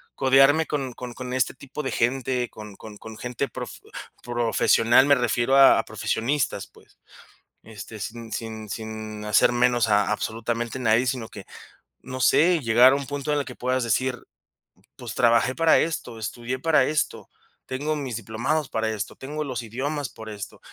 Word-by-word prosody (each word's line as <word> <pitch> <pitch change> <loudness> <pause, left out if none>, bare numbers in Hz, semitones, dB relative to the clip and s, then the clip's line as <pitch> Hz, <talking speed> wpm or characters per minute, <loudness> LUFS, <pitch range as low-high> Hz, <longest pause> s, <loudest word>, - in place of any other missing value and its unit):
codearme 135 +4 +5
con 135 -5 -3
con 125 0 -8
con 125 +1 -6
este 130 -2 +1
tipo 140 +3 -8
de 135 - -2
gente, 125 0 0
con 105 -2 -11
con 110 -1 -11
con 110 +1 -11
gente 125 +3 -3
prof - - -7 0.5
profesional, 120 +1 +3
me 145 0 +5
refiero 125 +1 +1
a 135 -1 +7
profesionistas, 130 +4 -2
pues. - - -23 0.7
Este, 110 0 -10
sin 115 +3 -7
sin 110 0 -5
sin 110 -1 -6
hacer 105 +3 +4
menos 120 -1 +2
a 105 0 +3
absolutamente 115 +2 -3
nadie, 120 0 +2
sino 125 -3 -2
que, 100 -4 -10 0.6
no 130 0 -7
sé, 165 +7 +4
llegar 125 0 +5
a - - +2
un 140 -1 -4
punto 145 +1 -2
en 145 - +1
el 140 - -3
que - - -9
puedas 130 0 -1
decir, 125 +3 -1 0.7
pues - - -7
trabajé 120 +2 +3
para 165 -1 +4
esto, 155 -8 -3
estudié 120 +4 -4
para 160 -2 +3
esto, 150 +1 -2 0.4
tengo 145 +4 -2
mis 135 -5 -4
diplomados 120 +8 -2
para 110 0 -1
esto, 110 -1 -4
tengo 150 +3 -5
los 130 -4 -4
idiomas 135 +5 -4
por 110 - -11
esto, 105 -2 -8
125 Hz, 170 wpm, -24 LUFS, 110-135 Hz, 0.7 s, a